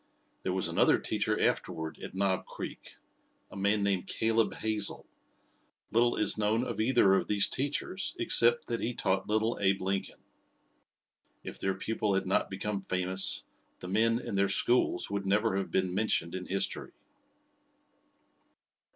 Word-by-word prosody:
There 95 - -2
was 95 0 -1
another - - +3
teacher - - -1
afterward 80 -3 -1
at - - -8
Knob 95 -1 0
Creek - - -8 0.6
a - - -11
man 100 +1 +1
named 100 -3 0
Caleb 115 0 +1
Hazel. 110 -2 -2 0.9
Little 120 +1 +3
is 105 0 +1
known 110 +3 +1
of 115 -4 -5
either 110 -4 +4
of 95 - +1
these 105 -1 +3
teachers 145 +7 -2
except 120 0 +3
that 115 -1 -3
he 120 +1 -2
taught 95 0 -1
little 110 +2 0
Abe 95 -1 +2
Lincoln. 95 +1 -3 1.3
If - - -8
their 95 0 -1
pupil 105 0 -1
had 95 - 0
not 95 - +1
become 100 +1 -3
famous 95 0 +1 0.3
the - - -9
men 115 +4 +2
and 110 - -5
their 100 0 +2
schools 120 +1 +2
would 100 -1 -3
never 105 +1 +2
have 100 - -3
been 95 -1 0
mentioned 100 -4 0
in 95 0 -5
history. 95 +1 -2
100 Hz, 150 wpm, -30 LUFS, 95-110 Hz, 1.3 s, either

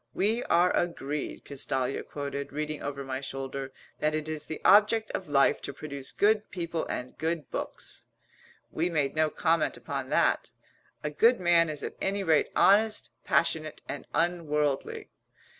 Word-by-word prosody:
"We 220 +5 +1
are 175 +1 +3
agreed," 150 -4 -2
Castalia 135 -1 -2
quoted, 140 -1 -5
reading 150 +1 -3
over 140 -1 -4
my 130 0 -4
shoulder, 135 0 -5 0.3
"that 155 0 +1
it 155 0 -3
is 155 -1 -3
the 155 - -5
object 215 +2 +5
of 185 - -4
life 140 -1 +3
to - - -5
produce 140 -3 -7
good 210 +1 +2
people 170 -3 -3
and 125 +1 -5
good 160 -2 -2
books." - - -6 0.6
We 165 +3 0
made 150 -4 0
no 155 0 +3
comment 160 -2 +1
upon 130 +2 -5
that. - - +2 0.5
"A 150 - -2
good 230 +11 +4
man 170 -2 +4
is 150 -2 -5
at - - -5
any 200 +1 0
rate 160 -4 +3
honest, 215 +2 +4
passionate 155 -2 +1
and 145 - -6
unworldly." 150 -5 0
155 Hz, 155 wpm, -29 LUFS, 140-175 Hz, 0.6 s, object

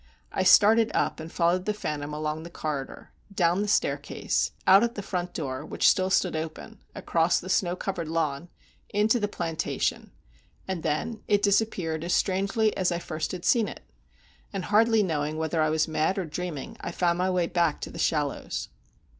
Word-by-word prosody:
I - - -1
started 215 +4 +6
up, - - 0
and 160 +1 -7
followed 175 +2 +1
the 210 - -1
phantom 150 -7 -4
along 155 +1 -3
the 170 - -9
corridor—down 170 +5 -2
the 210 - -1
staircase—out 195 -1 +2
at 235 0 -1
the 205 - -5
front 180 -2 -4
door, 135 -3 -3
which - - +1
still 185 0 +3
stood 185 -3 +2
open—across 165 0 -2
the 185 - -9
snow 180 -2 +1
covered 180 -3 -4
lawn—into 165 - -2
the 205 - 0
plantation; 165 -5 -2 0.6
and 190 -3 -3
then 215 +11 -2
it 205 0 +2
disappeared 195 -6 +1
as 175 - -1
strangely 200 +3 +1
as 185 -2 +1
I 170 - 0
first 155 -2 -4
had 180 -2 -6
seen 230 -4 +3
it; - - -9 0.7
and, 195 -3 -4
hardly 220 +1 +4
knowing 155 -3 -1
whether 160 0 0
I 155 - +2
was 155 +1 +1
mad 160 +4 0
or 190 - -1
dreaming, 160 -2 -5
I - - -4
found 175 0 +1
my 185 +1 +1
way 180 -2 +1
back 170 -3 +1
to - - -5
The - - -9
Shallows. 150 -3 -1
175 Hz, 170 wpm, -27 LUFS, 160-200 Hz, 0.7 s, started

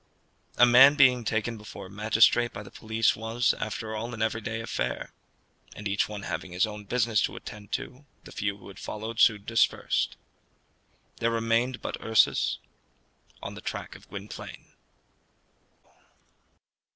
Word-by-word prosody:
A 125 - +8
man 130 +4 +8
being 130 -4 +5
taken 110 +1 -1
before 105 -2 -9
a - - -11
magistrate 110 +3 +3
by 105 - -7
the 100 - -13
police 110 0 +1
was, 115 +2 +1
after 110 0 -4
all, 115 +2 -4
an 110 - -7
everyday 110 0 -2
affair, 115 - -3 0.6
and 105 - -5
each 100 +1 0
one 105 -2 -6
having 90 0 -5
his 90 - +3
own 105 -1 -8
business 115 -1 +1
to - - -1
attend 105 -1 -10
to, 135 +3 -5 0.2
the - - -12
few 100 0 -2
who 95 - -14
had 95 - -12
followed 110 +1 -6
soon 105 -2 +4
dispersed. 115 -1 +1 1.0
There 115 - +1
remained 115 +2 0
but - - -3
Ursus 110 -1 +3 0.9
on - - -5
the - - -9
track - - -5
of - - -16
Gwynplaine. - - -9
110 Hz, 150 wpm, -27 LUFS, 105-115 Hz, 1.0 s, A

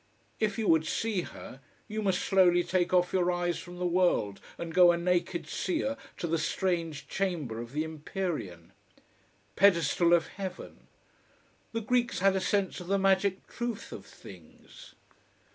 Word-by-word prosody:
If 210 -2 0
you 220 -2 -1
would 160 -1 +4
see 220 -1 -1
her, 135 -5 -10 0.3
you 215 0 -3
must 190 -3 0
slowly 180 -2 +4
take 180 -1 0
off 180 -1 +2
your 180 -1 +2
eyes 175 -1 -1
from 175 -1 -10
the 180 - -2
world 175 - +1 0.2
and 165 -1 -6
go 180 0 +7
a 170 - 0
naked 175 0 0
seer 315 -6 -1 0.2
to - - -3
the 165 0 0
strange 165 -1 -2
chamber 165 -12 -2
of 120 0 -9
the 150 +3 -1
empyrean. 155 - -5 0.8
Pedestal 170 -3 +4
of 165 - +1
heaven! 190 -2 -8 0.8
The 230 - -2
Greeks 240 +2 +1
had 195 +1 +3
a 190 - 0
sense 200 -1 0
of 180 - -9
the 200 +1 +2
magic 195 0 +2
truth 240 -3 -5
of 100 -1 -9
things. 85 -5 -15
180 Hz, 160 wpm, -29 LUFS, 165-195 Hz, 0.8 s, go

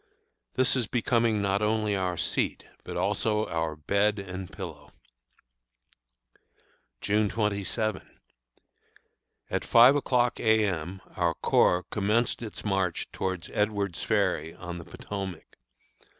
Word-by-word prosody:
This 130 +1 +3
is 125 -5 0
becoming 115 -3 +1
not 100 +1 +1
only 105 -1 +1
our 90 -2 -1
seat, - - -1 0.2
but - - -6
also 110 -1 +1
our 80 -2 -2
bed 100 +7 +1
and 95 -2 -6
pillow. - - -8 2.1
June 105 0 +2
27. 105 -1 -1 1.5
At - - 0
five 120 +4 +7
o'clock 125 -4 +1
A. 110 -1 +4
M. 90 0 -3
our - - +1
corps 90 +1 +3
commenced 105 +4 +1
its 110 -2 -7
march 95 -4 -1
towards 95 -3 -3
Edward's 100 -4 0
Ferry, 95 -7 0
on 90 -1 -7
the 85 - -10
Potomac. 95 -5 -7
100 Hz, 115 wpm, -28 LUFS, 95-110 Hz, 2.1 s, five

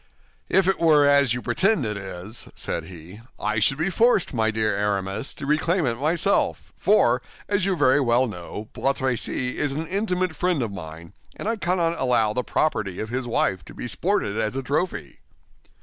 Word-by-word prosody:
"If 190 -1 +3
it 190 - +2
were 155 -3 +5
as 140 -4 +4
you 125 - -5
pretend 175 - +1
it 105 -1 -2
is," 95 +2 -6
said 80 - -3
he, 90 +4 -12 0.2
"I 110 -1 0
should 135 +6 +3
be 160 +5 0
forced, 230 -6 +3
my 110 -2 +1
dear 110 -1 0
Aramis, 100 +2 -2
to 140 - -6
reclaim 160 +4 +1
it 120 - +1
myself; 165 +6 0
for, - - +3 0.3
as 200 -2 +1
you 195 - +1
very 145 -3 +4
well 125 -1 +3
know, 105 0 -7
Bois 135 - +1
Tracy 125 -1 -2
is 145 -2 0
an 155 +3 -3
intimate 185 -2 -1
friend 175 -4 0
of 110 - -3
mine, 85 -2 -9 0.2
and - - -6
I 225 - +1
cannot 175 -4 0
allow 115 -4 +2
the 125 - -1
property 110 - -1
of 110 - -4
his 125 +1 -3
wife 95 -5 0
to - - -12
be - - -5
sported 115 - -1
as 110 +2 -1
a 135 - -2
trophy." 150 +7 -2
130 Hz, 190 wpm, -24 LUFS, 105-165 Hz, 0.3 s, were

